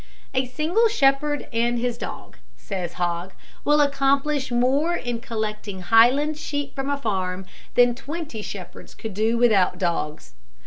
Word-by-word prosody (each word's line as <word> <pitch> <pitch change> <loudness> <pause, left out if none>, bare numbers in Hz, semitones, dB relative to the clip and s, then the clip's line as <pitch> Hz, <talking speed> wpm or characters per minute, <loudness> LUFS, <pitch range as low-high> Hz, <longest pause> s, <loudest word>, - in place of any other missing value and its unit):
A 260 -1 +1
single 330 - +2
shepherd 290 -6 +2
and 235 +1 +1
his 240 0 -1
dog, 240 - -8 0.2
says 180 -4 -5
Hogg, 175 +1 -2 0.3
will 295 0 +4
accomplish 280 0 +1
more 270 +8 +2
in 240 -5 -3
collecting 215 -4 -4
Highland 250 +10 +4
sheep 285 -2 -3
from 270 0 -3
a 285 - 0
farm 190 -6 -2 0.3
than 245 0 +5
twenty 290 -2 -6
shepherds 190 -4 -9
could 220 -3 -6
do 220 +4 +1
without 205 -7 +3
dogs. 170 -4 -2
240 Hz, 140 wpm, -24 LUFS, 205-285 Hz, 0.3 s, than